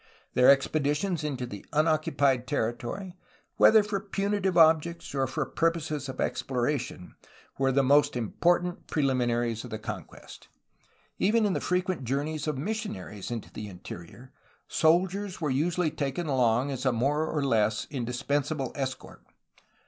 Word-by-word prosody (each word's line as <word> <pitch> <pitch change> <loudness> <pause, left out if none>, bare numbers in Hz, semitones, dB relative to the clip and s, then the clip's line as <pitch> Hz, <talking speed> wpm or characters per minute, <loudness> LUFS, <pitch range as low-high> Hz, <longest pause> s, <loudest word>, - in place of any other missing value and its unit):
Their 125 - +6
ex 135 0 +5
peditions 155 +3 0
into 125 -8 -4
unoccupied 145 -4 +2
territory, 140 - -3 0.4
whether 220 -1 +7
for 205 -1 -2
punitive 195 -1 -1
objects 165 0 +3
or 135 -1 +1
for 130 - -2
purposes 160 -4 -1
of 130 - -7
exploration, 125 -6 -2 0.5
were 135 0 +3
the 135 +1 +3
most 145 +1 +4
im 115 -4 -2
portant 175 0 +1
preliminaries 120 -5 0
of - - -8
the 110 - -4
conquest; 105 - -9 0.7
even 215 +3 +3
in 200 - +1
the - - -2
frequent 180 -3 -1
journeys 145 +5 -2
of 150 -3 -1
missionaries 140 - -4
into 120 -3 -6
the 105 - -6
interior, 95 +6 -10 0.3
soldiers 185 +4 +1
were 150 -4 -1
usually 160 +4 +1
taken 150 +2 -3
along 130 -1 +2
as 130 -2 -4
a 130 - +3
more 145 +7 +1
or 150 -3 -1
less 110 -4 +1
indispensable 135 +2 -2
escort. 135 -2 -5
145 Hz, 140 wpm, -28 LUFS, 125-170 Hz, 0.7 s, whether